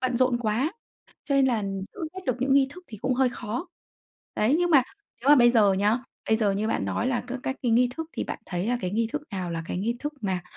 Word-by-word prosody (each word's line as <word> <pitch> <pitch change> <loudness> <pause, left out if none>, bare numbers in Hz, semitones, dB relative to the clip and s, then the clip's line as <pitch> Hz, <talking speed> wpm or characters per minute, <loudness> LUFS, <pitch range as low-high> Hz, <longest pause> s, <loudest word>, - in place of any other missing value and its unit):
bận 255 -1 0
rộn 255 -1 +2
quá, 240 - 0 0.5
cho 280 - 0
nên 270 -1 +5
là 230 -5 +1 0.3
giữ - - -10
hết 375 - -6
được 255 - +1
những 270 +1 +2
nghi 275 -1 +5
thức 360 +3 -12
thì 215 - -10
cũng 255 -1 +1
hơi 260 0 +3
khó. 240 - -5 0.7
Đấy, 235 +8 +3
nhưng 350 0 +1
mà 275 -5 +7 0.4
nếu 265 - -2
mà 295 - +9
bây 240 -1 +6
giờ 210 -5 +5
nhá, 205 +5 +2 0.3
bây 220 - +4
giờ 210 -3 +2
như 210 +3 -1
bạn - - 0
nói 235 - -1
là 250 -2 0
các 255 +1 -5
các 265 - -2
cái 245 - +1
nghi 245 +1 +4
thức 325 0 -5
thì - - -3
bạn - - -5
thấy 180 +2 -2
là 245 - +1
cái 185 - -2
nghi 225 +3 0
thức 300 - -2
nào 185 -3 -3
là 165 -1 -3
cái - - -3
nghi 230 +5 -1
thức 295 +1 -4
mà 190 -4 -1
240 Hz, 275 wpm, -26 LUFS, 215-265 Hz, 0.7 s, mà